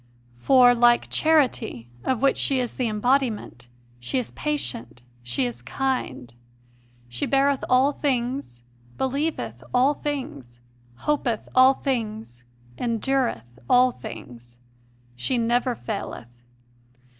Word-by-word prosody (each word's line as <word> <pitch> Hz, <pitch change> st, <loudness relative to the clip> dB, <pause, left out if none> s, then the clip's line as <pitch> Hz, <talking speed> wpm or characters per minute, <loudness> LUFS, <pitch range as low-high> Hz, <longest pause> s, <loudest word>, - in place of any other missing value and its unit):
7 120 Hz, -, -28 dB
For, 250 Hz, -2 st, +6 dB
like 240 Hz, 0 st, +3 dB
Charity, 255 Hz, -, +1 dB, 0.2 s
of 260 Hz, 0 st, -1 dB
which 275 Hz, -, +3 dB
she 270 Hz, -2 st, +1 dB
is 245 Hz, -2 st, -3 dB
the 250 Hz, -, 0 dB
embodiment, 220 Hz, -, 0 dB, 0.3 s
she 120 Hz, -, -3 dB
is 250 Hz, -, -2 dB
patient, 265 Hz, -, -4 dB, 0.2 s
she 120 Hz, +2 st, -1 dB
is 120 Hz, 0 st, -5 dB
kind;... 130 Hz, -, -3 dB, 0.7 s
she 120 Hz, 0 st, -3 dB
beareth 275 Hz, 0 st, +2 dB
all 260 Hz, +3 st, +4 dB
things, 250 Hz, -, -2 dB, 0.3 s
believe 280 Hz, +5 st, 0 dB
th 115 Hz, -2 st, -5 dB, 0.2 s
all 260 Hz, +4 st, +4 dB
things, 145 Hz, -, -6 dB, 0.5 s
hopeth 265 Hz, -7 st, 0 dB
all 260 Hz, +1 st, +6 dB
things, 220 Hz, -, -4 dB, 0.4 s
endureth 230 Hz, -, -1 dB
all 250 Hz, +1 st, +5 dB
things; 120 Hz, -, -11 dB, 0.6 s
she 125 Hz, -, -1 dB
never 240 Hz, +2 st, +1 dB
faileth. 120 Hz, -, -7 dB
245 Hz, 115 wpm, -24 LUFS, -, 0.7 s, For